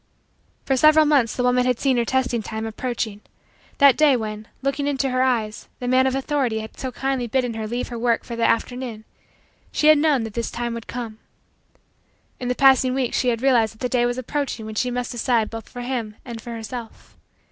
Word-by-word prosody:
For 270 - +2
several 310 +3 +6
months, 275 -7 +3
the 250 - -1
woman 250 0 +3
had 250 -2 +1
seen 265 -3 +2
her 235 - +1
testing 250 -2 0
time 220 +1 -5
approaching. 225 -2 -4 0.6
That 280 -3 +7
day 295 -4 +4
when, 215 -1 -5 0.2
looking 275 +1 -1
into 275 -2 0
her 255 0 +1
eyes, 230 -5 0
the 245 - -4
man 260 +1 +4
of 265 - 0
authority 270 -5 0
had 220 - -10
so 260 - -3
kindly 265 -2 -2
bidden 245 0 0
her 220 -1 -4
leave 240 +3 -3
her 240 -1 -5
work 235 -1 +1
for 235 - -6
the 230 - -2
afternoon, 230 -1 -2 0.7
she 305 - +3
had 310 -1 +7
known 290 -5 +2
that 225 -2 -6
this 235 0 -2
time 235 0 -3
would 230 -1 -7
come. 230 -3 -6 1.2
In 250 - -4
the 250 - 0
passing 265 -1 +5
weeks 260 -3 0
she 255 - 0
had 235 0 0
realized 230 -5 +3
that - - -23
the 250 - -1
day 240 -1 +2
was 245 +1 -2
approaching 255 -3 -3
when 220 - -6
she 250 +4 0
must 245 0 -3
decide 235 -2 0
both 225 -1 -8
for 245 - -7
him 240 -4 -3
and 235 -3 -7
for 240 - -10
herself. 230 0 -8
245 Hz, 215 wpm, -22 LUFS, 230-260 Hz, 1.2 s, That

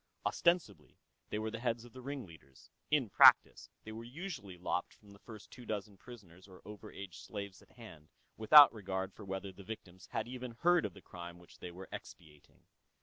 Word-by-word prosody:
Ostensibly, 160 - 0 0.3
they - - -2
were 110 +1 -3
the 115 - -5
heads 120 -1 -2
of 120 - -15
the 130 - -10
ringleaders: 90 - -9 0.2
in 150 -5 +2
practice, - - +6
they 110 - -8
were 110 +1 -7
usually 130 - -7
lopped 90 - -3
from 105 - -19
the 100 - -16
first 110 -2 -12
two 125 - -11
dozen 105 -2 -4
prisoners 95 -4 -14
or 95 -2 -14
over 105 -1 -10
age 95 -3 -9
slaves 100 -2 -7
at - - -22
hand, 85 -11 -13 0.3
without 140 +5 +9
regard 95 -3 -4
for 105 - -11
whether 95 0 -5
the 100 +1 -13
victims 95 -3 -9
had 115 0 -3
even 125 -1 -6
heard 175 +1 +4
of - - -14
the 100 - -14
crime 85 -1 -9
which 85 0 -18
they 90 - -7
were 90 +2 -10
expiating. 75 -2 -12
105 Hz, 195 wpm, -34 LUFS, 95-120 Hz, 0.3 s, without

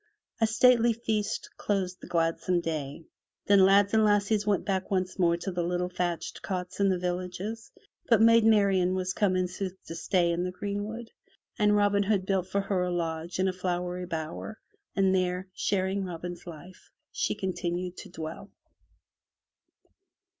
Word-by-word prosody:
A 225 - +4
stately 235 +1 +4
feast 220 -2 -2
closed 185 -3 -2
the - - -10
gladsome 170 +1 +1
day, 155 -2 -4 0.4
then 200 -1 +5
lads 200 +2 +5
and 220 0 +5
lassies 205 0 +2
went 200 -3 +1
back 190 -2 -1
once 185 -1 -1
more 170 -2 +3
to 190 +3 -4
the 175 -1 -2
little 180 +1 -1
thatched 175 -2 -3
cots 180 -1 -4
in 200 -1 +4
the 185 - +2
villages. 180 +5 -4 0.4
But 230 -3 +6
Maid 230 0 +6
Marian 195 -4 +3
was 185 0 -1
come 195 -2 +1
in 185 0 +1
sooth 185 +1 -5
to - - -7
stay 170 +1 +1
in 170 +1 -1
the 180 - -1
greenwood, 205 +4 -5 0.5
and 210 0 +4
Robin 205 -1 +3
Hood 200 -2 +1
built 190 -2 0
for 200 - 0
her 195 -2 -1
a 180 - 0
lodge 165 -1 -3
in 190 +1 +2
a 185 - 0
flowery 180 0 -3
bower, 165 +6 -5 0.4
and 195 -1 +3
there, 185 0 0
sharing 195 0 0
Robin's 175 -1 -6
life, 175 +3 -11 0.2
she - - -1
continued 180 -1 -3
to - - -9
dwell. 160 +3 -7
185 Hz, 165 wpm, -28 LUFS, 180-205 Hz, 0.5 s, But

